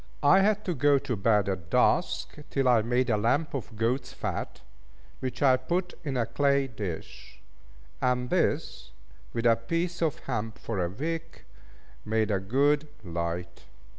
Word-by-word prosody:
I 165 +7 +7
had 210 +1 +2
to 180 - 0
go 145 0 +4
to 135 -3 -2
bed 105 -1 +2
at 95 -5 -3
dusk, - - +2
till 135 -2 +1
I 120 -3 +5
made 120 +2 +1
a 105 - +3
lamp 120 +9 +1
of 125 -4 -5
goat's 125 +4 -1
fat, - - -4 0.6
which 130 +1 -3
I 130 -2 +6
put 175 +8 -2
in 140 -4 -2
a 115 - +1
clay 140 +3 +2
dish; 105 -9 -7 0.6
and 125 -1 0
this, 65 0 0 0.4
with 115 0 -3
a 115 -1 +6
piece 165 +10 -2
of 160 -4 +1
hemp 110 -3 -3
for 100 -6 -2
a 85 - -1
wick, 165 - -5 0.6
made 110 0 0
a 100 - +2
good 140 +9 +2 0.2
light. 85 0 -4
125 Hz, 160 wpm, -28 LUFS, 105-145 Hz, 0.6 s, I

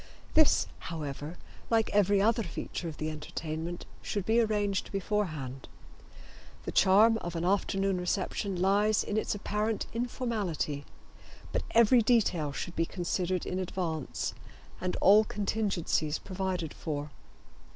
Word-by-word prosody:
This, 315 -2 +5 0.2
however, 150 0 -5 0.3
like 225 -1 +2
every 200 0 +4
other 225 +3 +3
feature 175 -1 -5
of 155 - -9
the 155 0 -2
entertainment, 160 +2 -5 0.2
should 200 -3 -3
be 225 +2 +3
arranged 205 -3 0
beforehand. 160 -10 -2 1.0
The - - -4
charm 220 +4 +5
of 175 -3 -5
an 165 +1 -1
afternoon 195 0 +1
reception 185 +1 -1
lies 205 +3 +3
in 210 - -3
its 215 - 0
apparent 210 +2 -1
informality, 220 - -2 0.7
but - - 0
every 235 +1 +6
detail 205 - +2
should 175 +5 -5
be 165 0 +1
considered 180 0 -1
in 185 - -2
advance 170 -5 -3 0.5
and 185 0 -1
all 210 +3 +7
contingencies 200 -8 0
provided 185 -4 -3
for. 150 -2 -4
190 Hz, 125 wpm, -30 LUFS, 165-210 Hz, 1.0 s, all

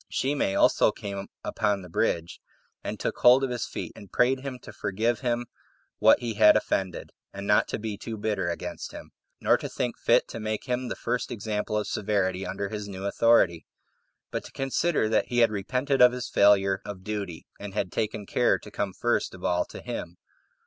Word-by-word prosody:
Shimei 135 -8 0
also - - +4
came 100 -1 -6 0.2
upon 100 -2 0
the - - -9
bridge, 85 -2 -1 0.4
and - - -4
took - - -3
hold 125 +2 +7
of 135 - 0
his 120 -2 -2
feet, - - -5
and 100 - -13
prayed 130 +2 +3
him 130 -1 -6
to 105 - -10
forgive 110 +4 -1
him 120 0 -1 0.5
what - - +6
he 120 -2 -2
had 105 0 +7
offended, 95 -4 -2 0.2
and 100 0 -7
not 105 0 +4
to - - -3
be 105 -1 -4
too 115 -2 -5
bitter 105 -4 -1
against 85 - -5
him, - - -10 0.3
nor - - +4
to - - -6
think - - -3
fit - - +3
to - - -6
make 110 0 -3
him 125 0 -2
the - - -3
first 125 -1 -2
example 105 -1 -2
of 105 - -1
severity 95 -2 -1
under 100 +1 -3
his 105 -1 -5
new 95 -1 -6
authority; 100 -6 +3 0.6
but - - -3
to - - -11
consider 135 0 0
that 110 - +1
he 120 - -3
had 115 -2 +5
repented 125 +7 0
of 125 0 +8
his 125 -1 -4
failure 100 -1 +4
of 100 -2 -8
duty, 100 -5 -5
and 100 -1 -7
had 100 -4 -1
taken 105 -1 -2
care 120 +4 +2
to 105 - -13
come 100 -2 -2
first 120 -2 0
of 90 - -13
all 90 0 +1
to - - -10
him. 85 0 -5
105 Hz, 200 wpm, -27 LUFS, 100-120 Hz, 0.6 s, of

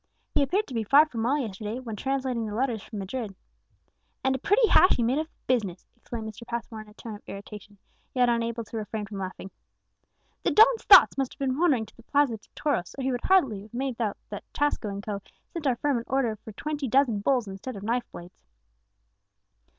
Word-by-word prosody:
"He - - +3
appeared 375 +10 +1
to 265 - -10
be 225 -2 0
far 280 +8 +6
from 240 -8 -5
well 255 +6 +2
yesterday, 220 -3 -4
when 235 -4 -6
translating 260 -1 -1
the 210 - -5
letters 240 -3 0
from 215 - -9
Madrid." 200 +1 -4 0.9
"And 265 0 +2
a 265 - -2
pretty 440 - +4
hash 370 - +6
he 240 - 0
made 255 +6 +2
of 315 - -2
the - - -38
business," 205 -8 -1
exclaimed 235 -2 -7
Mr. 220 +2 -9
Passmore 230 -2 -5
in 215 - -13
a 210 - -18
tone 225 -1 -8
of 205 - -10
irritation, 205 0 -9 0.4
yet 250 -1 +4
unable 235 0 0
to 225 - -7
refrain 215 0 -4
from 200 -1 -7
laughing. 190 0 -6 0.9
"The - - +1
don's 455 +2 +5
thoughts 385 -7 +8
must 265 -2 -1
have - - -43
been 270 0 -1
wandering 285 -10 +3
to - - -19
the - - -16
Plaza 280 -1 +1
de - - -26
Toros, 235 - -1
or 270 - -3
he 265 - +1
would 245 -1 -2
scarcely 275 - +3
have 215 +3 -13
made 255 -2 -2
out 210 -3 -1
that - - -6
Tasco 290 -7 0
and 200 0 -5
Co. 200 -1 -4 0.3
sent 330 -5 -3
our 255 - +3
firm 280 0 0
an - - -6
order 255 -4 +1
for 220 +1 -11
twenty 295 +5 -3
dozen 250 -3 +3
bulls 245 +1 +1
instead 195 +7 -7
of 200 - -8
knife 235 +3 -1
blades." 175 +1 -12
235 Hz, 220 wpm, -27 LUFS, 215-270 Hz, 0.9 s, thoughts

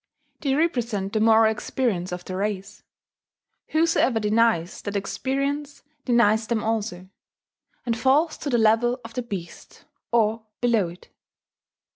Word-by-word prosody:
They 275 -3 0
represent 240 - -1
the 215 - +1
moral 220 0 +5
experience 215 -5 -2
of 180 0 -6
the 185 - -5
race: 200 +1 -3 0.9
whosoever 315 -7 +2
denies 215 -5 +1
that 205 0 -5
experience 275 +7 -2 0.2
denies 225 -3 +3
them 225 -1 -1
also, 210 -5 -2 0.8
and 235 -2 0
falls 290 +7 +2
to 290 - -4
the 245 - +2
level 230 +3 +3
of 225 - -9
the 250 - -2
beast, 195 -8 -8 0.3
or 225 -1 +2 0.2
below 230 -6 +2
it. 175 +2 -14
225 Hz, 130 wpm, -24 LUFS, 205-250 Hz, 0.9 s, moral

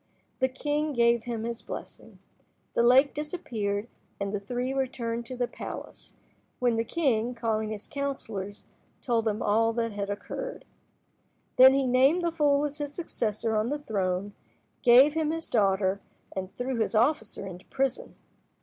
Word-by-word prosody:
The 260 - +3
king 295 +3 -1
gave 235 -2 +3
them 230 -2 -3
his 235 0 -4
blessing. - - -8 0.6
The - - +2
lake 255 +4 +5
disappeared, 230 - -3 0.3
and 200 0 -2
the 205 - 0
three 245 +5 -3
returned 235 -3 -2
to 255 - -6
the 245 -1 0
palace, - - -8 0.4
when 245 -2 +2
the 225 - +1
king, 245 -4 0
calling 220 -2 -1
his 215 -1 -6
counsellors, 225 -8 -5 0.3
told 230 -3 0
them 215 -1 0
all 225 +2 +3
that 230 -1 -1
had 200 -1 -4
occurred. - - -5 0.9
Then 260 +1 +9
he 275 -1 +2
named 265 +8 +4
the 340 - +1
fool 295 -3 +2
as 295 +1 -5
his 290 -1 -3
successor 225 - -2
on 215 +2 +1
the 295 - -1
throne, 200 -6 -2 0.5
gave 260 +4 +7
him 315 -1 0
his 325 +1 -2
daughter, 195 -2 +2 0.3
and 190 0 -4
threw 250 0 -2
his 220 0 0
officer 220 -4 +1
into 180 -1 -9
prison. 265 -1 -2
235 Hz, 160 wpm, -28 LUFS, 215-275 Hz, 0.9 s, Then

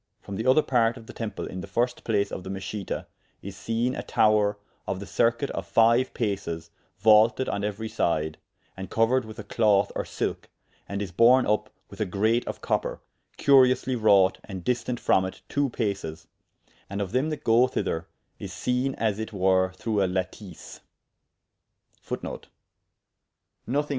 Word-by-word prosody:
From 100 - -8
the 110 +5 -3
other 135 +4 +5
part 120 -2 +2
of 115 - -12
the - - -11
temple 115 -2 -5
in 95 - -6
the - - -8
first 120 +5 -1
place 105 -3 0
of 90 - -5
the 95 - -7
Meschita, 95 +1 -4 0.4
is 100 0 -7
seene 115 +4 -1
a - - -3
tower 105 -1 +2 0.3
of 95 - -2
the 100 - -7
circuite 115 +6 +1
of - - -6
fyue 115 +3 +4
pases 85 -7 -3 0.3
vaulted 110 +4 +5
on 100 - -2
euery 105 +2 -3
syde, 80 -6 -1 0.4
and 95 0 -7
couered 115 +2 +2
with 110 -1 -10
a - - -6
cloth 105 -3 +2
or - - -1
silk, - - -4 0.4
and 100 0 -2
is 95 - -7
borne 120 +7 +5
vp 105 +1 0 0.2
with - - -8
a - - +2
grate 110 +5 +1
of - - -5
copper, - - -1 0.4
curiously 130 -1 +4
wrought 100 -5 +4
and 95 -4 -7
distant 120 +1 -1
from 95 - +3
it 95 - -7
two 140 -1 0
pases; 95 -9 -3 0.6
and 100 +1 -4
of 100 -2 -3
them 130 +5 +1
that 150 -2 -5
goe 115 +3 +5
thyther, 80 -9 -2 0.3
is - - -6
seene 125 +2 -1
as 110 -2 -1
it 110 - -4
were 95 -2 +2
through 105 +2 -1
a - - +2
lateese. 95 0 -5
110 Hz, 165 wpm, -26 LUFS, 95-120 Hz, 0.6 s, other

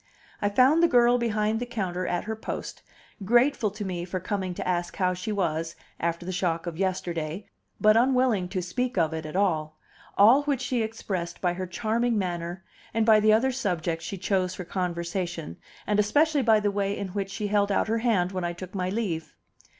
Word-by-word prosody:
I 205 - +2
found 260 +10 +4
the 340 - +6
girl 245 -3 +4
behind 215 -1 0
the 245 - -3
counter 185 -6 -3
at 175 - -1
her 220 +1 -4
post, 220 - -6 0.4
grateful 240 +2 +3
to 210 +1 -6
me 180 -2 -3
for 185 +1 -4
coming 185 -1 -3
to - - -4
ask 175 -1 -1
how 185 -2 +1
she 185 +4 -4
was 165 -4 -1 0.2
after 170 +1 -2
the 185 - -3
shock 175 -2 -1
of 170 -2 -4
yesterday, 180 -2 -2 0.3
but 215 0 +5
unwilling 245 -6 +3
to 185 -1 -2
speak 245 +7 -2
of 160 -2 +2
it 160 -1 -4
at 155 - -8
all; 155 -6 0 0.4
all 230 +8 +7
which 280 -4 0
she 250 -2 0
expressed 195 -6 -4
by 175 -2 +1
her 185 +1 -4
charming 230 +4 0
manner, 175 -1 -3 0.3
and 225 -1 +2
by 220 -1 +6
the 215 0 +4
other 235 +5 +3
subjects 175 -9 -2
she 195 - -5
chose 185 -1 0
for 180 - -6
conversation, 175 - -3 0.3
and 210 0 +1
especially 290 +8 +3
by 220 -3 +4
the 205 -1 0
way 200 0 -1
in 200 - -4
which 195 +1 -3
she 210 +2 -4
held 205 0 +2
out 195 - +1
her 225 +1 0
hand 205 -7 +1
when 185 -2 -3
I 175 0 -1
took 185 +1 -9
my 185 -2 -1
leave. 185 -6 -3
195 Hz, 205 wpm, -26 LUFS, 175-220 Hz, 0.4 s, all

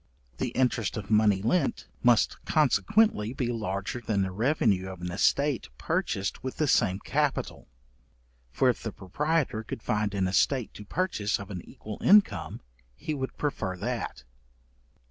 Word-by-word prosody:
The - - 0
interest 120 -5 +1
of 105 0 -6
money 105 -3 +4
lent, 140 +6 0
must 120 -2 +3
consequently 155 - +2
be 125 -2 -1
larger 105 +1 -3
than 105 -3 0
the 95 - -2
revenue 105 -4 +1
of 95 -2 -8
an 90 0 -4
estate 140 - +1
purchased 100 +4 -2
with 130 - -5
the 155 - +2
same 100 -8 +3
capital; - - -1 0.8
for 130 - +1
if 125 - +1
the 110 - -4
proprietor 145 - -1
could 110 - -7
find 105 -1 0
an 95 -1 +1
estate 120 +6 +1
to 105 - -10
purchase 130 - -1
of 100 0 -8
an 90 -3 -5
equal 105 -1 -8
income, 205 +1 +4 0.3
he 155 - -4
would 130 -2 -4
prefer 95 -11 -2
that. 105 - -4
110 Hz, 150 wpm, -28 LUFS, 100-135 Hz, 0.8 s, money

